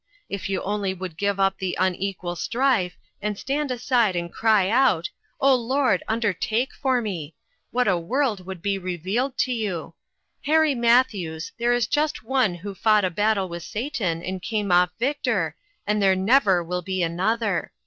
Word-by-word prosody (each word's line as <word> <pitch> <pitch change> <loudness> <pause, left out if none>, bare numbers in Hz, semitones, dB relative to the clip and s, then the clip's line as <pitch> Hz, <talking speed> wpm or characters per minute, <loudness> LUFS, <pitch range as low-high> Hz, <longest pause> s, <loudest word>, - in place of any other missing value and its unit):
If 200 -1 -4
you 190 -1 -1
only 200 -1 -1
would 185 -3 -6
give 200 +3 -1
up 195 0 +2
the 185 -2 -2
unequal 185 -1 -1
strife, 230 -3 0 0.2
and 210 -1 -2
stand 285 +4 -2
aside 245 -5 +1
and 170 0 -3
cry 215 -4 +3
out, 225 -7 +2 0.2
' - - -44
O 275 0 +5
Lord, 260 +2 +1
undertake 225 - 0
for 260 -3 0
me 165 -8 -5 0.2
'! - - -46
what 250 -1 +1
a 185 -3 +3
world 225 +1 -1
would 190 -3 -7
be 200 -1 0
revealed 190 - -2
to 255 - +1
you. 190 -9 -3 0.5
Harry 310 0 +4
Matthews, 230 -10 +1
there 240 +1 +2
is 240 -2 +2
just 295 +1 -1
One 240 -6 +1
who 195 +4 -7
fought 210 +1 +3
a 185 - -1
battle 205 +1 +1
with 170 -1 -6
Satan 210 - -3
and 185 0 -4
came 210 -2 -2
off 180 0 +5
victor, 280 +5 0 0.3
and 210 0 +1
there 190 -1 +4
never 190 -2 +3
will 180 +2 -3
be 185 0 -2
another. 195 +5 0
205 Hz, 175 wpm, -24 LUFS, 185-245 Hz, 0.5 s, O